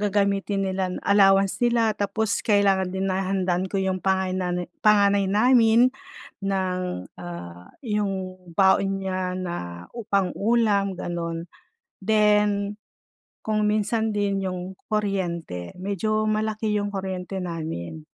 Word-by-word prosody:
gagamitin 200 -1 +1
nila 190 -1 -2
allowance 195 -1 +4
nila. 235 -2 +3
Tapos 205 +1 -1
kailangan 195 -3 +3
din 190 +1 -3
na 190 - 0
handaan 185 -1 0
ko 200 - -3
yung 190 -1 0
pangaynane 185 -2 -1
panganay 200 -2 +4
namin 235 +3 +5 0.5
ng, 185 - -2
ah, 85 0 -9
yung 200 - -2 0.2
baon 195 +2 +3
niya 185 -1 -2
na 180 -1 -3 0.4
u 235 - -5
pang-ulam 200 -1 +1
gano'n. 170 -1 -4 0.6
Then 210 -1 +2 0.7
kung 215 -1 0
minsan 215 +1 0
din 200 -1 0
yung 185 0 -5
kuryente, 175 - -2
medyo 205 +3 -1
malaki 215 0 -1
yung 205 0 -3
kuryente 190 0 -4
namin. 155 - -5
195 Hz, 110 wpm, -24 LUFS, 185-210 Hz, 0.7 s, namin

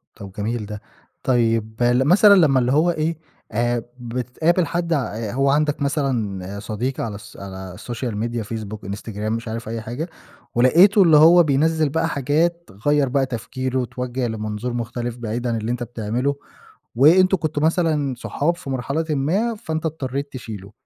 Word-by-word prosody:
طَب 100 -1 -10
جميل 110 +2 -3
ده. 105 0 -7 0.4
طيب 115 -3 +1
مثلًا 145 - +6
لمّا 145 -8 +5
اللي 125 +1 +1
هو 160 +5 +3
إيه، 160 0 -1 0.3
آآ، 120 +1 0 0.2
بتقابل 125 +9 0
حد 170 +2 -1
ع 145 - +2 0.2
آآ، 110 -3 -4
هو 135 +1 +2
عندك 150 +1 +1
مثلًا 110 - -2
صديق 120 +5 -3
على 110 -3 -3
الـص 105 +3 -12
على 95 -2 -8
Social 120 -1 -4
Media 115 +2 -2
Facebook، 110 -3 -6
Instagram، 105 +1 -7
مش 115 +1 -3
عارف 115 0 -5
أي 115 -1 -4
حاجة، 125 +10 -5 0.5
ولقيته 185 - +6
اللي 160 -3 +6
هو 170 +3 +8
بينزّل 155 +2 +2
بقى 160 +3 0
حاجات 165 +5 0 0.2
غيّر 145 -2 +3
بقى 135 0 +2
تفكيره 130 +1 -3
اتوجه 125 +1 -3
لمنظور 110 +2 -4
مختلف، 120 0 -4
بعيدًا 120 +1 -2
اللي 110 +2 -2
أنت 125 0 -2
بتعمله، 120 +4 -2 0.6
وأنتم 185 +8 +6
كنتم 155 -3 -2
مثلًا 155 -5 +1
صحاب 170 +7 -1
في 175 -6 -8
مرحلة 140 +5 -1
ما، 180 +12 +1
فانت 160 -5 -4
اضطريت 140 -2 -4
تشيله. 105 -5 -8
130 Hz, 160 wpm, -22 LUFS, 115-155 Hz, 0.6 s, هو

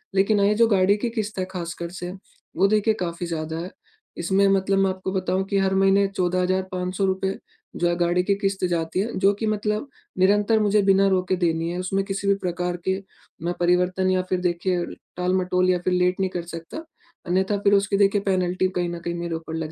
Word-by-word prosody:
लेकिन 200 +2 +3
हाँ 200 - +4
ये 210 - +3
जो 230 +1 +4
गाड़ी 200 -1 +3
की 235 +3 -2
किश्त 215 -4 -4
है 185 - 0
ख़ास 170 -2 -4
कर 170 - -3
से 175 0 -4 0.5
वो 195 +2 +4
देखिए 215 +1 +2
काफ़ी 170 0 -3
ज़्यादा 160 -1 -4
है। 180 +3 -6 0.5
इसमें 190 +3 +2
मतलब 195 0 +2
मैं 195 0 +3
आपको 190 0 -4
बताऊँ 185 0 0
कि 200 0 0
हर 190 0 +1
महीने 195 +1 +4
₹14,500 185 +1 -1 0.4
जो 175 - +1
है 175 - +1
गाड़ी 175 +1 +2
की 200 - +2
किश्त 195 -2 -1
जाती 170 +1 -1
है 225 +4 -1
जो 195 +1 +4
कि 220 +2 -4
मतलब 210 +4 -1 0.3
निरंतर 205 +3 +3
मुझे 210 0 +3
बिना 195 0 +4
रोके 185 0 +1
देनी 165 0 +1
है। 175 - -4
उसमें 195 +2 -1
किसी 200 0 -3
भी 200 - +5
प्रकार 180 -1 -3
के 190 - +2 0.5
ना 175 - 0
परिवर्तन 180 +1 +2
या 185 0 +2
फिर 185 - +1
देखिए 175 0 0 0.3
टाल-मटोल 180 0 +1
या 180 - +3
फिर 185 - +2
लेट 180 +1 +1
नहीं 190 -1 +1
कर 175 -2 -4
सकता। 165 - -7 0.4
अन्यथा 190 +3 +1
फिर 200 - +4
उसकी 200 0 +2
देखिए 200 0 +3
पेनल्टी 185 -1 +1
कहीं 175 -1 0
न 170 0 -5
कहीं 170 0 -4
मेरे 170 -1 -3
ऊपर 160 0 -6
लग 160 -1 -4
185 Hz, 210 wpm, -23 LUFS, 180-195 Hz, 0.5 s, भी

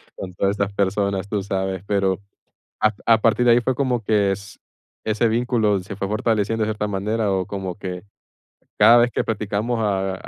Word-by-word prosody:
con 95 -1 -7
todas 100 +1 +1
estas 100 -1 -2
personas", 100 0 0
tú 105 -1 -2
sabes, 95 -1 -3
pero 95 -2 +1 0.6
a 110 0 +3
a 115 0 +6
partir 115 +2 +2
de 120 - +6
ahí 120 - +4
fue 130 +2 0
como 125 -4 0
que 100 -2 +2
s 100 +1 -7 0.4
ese 110 +2 +1
vínculo 110 -3 +1
se 95 +2 -8
fue 100 - -3
fortaleciendo 110 +1 0
de 105 - -1
cierta 105 -1 -2
manera, 105 +1 -1
o 95 -1 0
como 95 -3 -5
que, 90 -1 -6 0.8
cada 115 +3 +7
vez 120 +1 +3
que - - -1
platicamos 110 +2 -2
a 95 -2 0
105 Hz, 185 wpm, -22 LUFS, 95-110 Hz, 0.8 s, cada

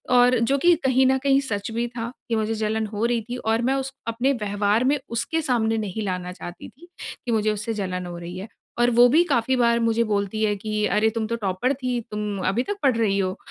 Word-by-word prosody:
और 245 0 +5
जो 235 +5 +2
कि 350 +5 +5
कहीं 260 0 +4
न 265 0 +3
कहीं 275 -1 +4
सच 205 0 -3
भी 235 +1 -1
था 230 0 -3 0.2
कि 230 - +1
मुझे 220 0 0
जलन 220 0 -1
हो 210 +2 -2
रही 235 -1 +1
थी। 245 - -3
और 225 -1 0
मैं - - +2
उस 270 0 -3 0.2
अपने 240 +4 +1
व्यवहार 210 0 0
में 280 +3 +3 0.2
उसके 320 +8 -1
सामने 225 -6 +1
नहीं 215 0 -3
लाना 180 -1 -3
चाहती 175 -1 -9
थी 335 +7 -18 0.4
कि 240 - -1
मुझे 215 -1 +2
उससे 210 +2 -3
जलन 180 -1 -3
हो 175 -1 -7
रही 175 +1 -7
है। 190 +3 -6 0.3
और 240 0 +4
वो 240 +1 +7
भी 320 +6 +5
काफ़ी 240 +3 +2
बार 235 -1 +3
मुझे 230 +1 +2
बोलती 200 +2 -1
है 210 -1 +2
कि 210 +1 -2
अरे 215 +1 +2
तुम 220 -1 -1
तो 230 - -1
टॉपर 210 +4 -1
थी 255 -2 -2
तुम 210 -1 -3
अभी 220 +7 +1
तक 410 - -3
पढ़ 260 -4 +4
रही 210 -4 +1
हो। 185 -1 -1
225 Hz, 240 wpm, -24 LUFS, 205-245 Hz, 0.4 s, वो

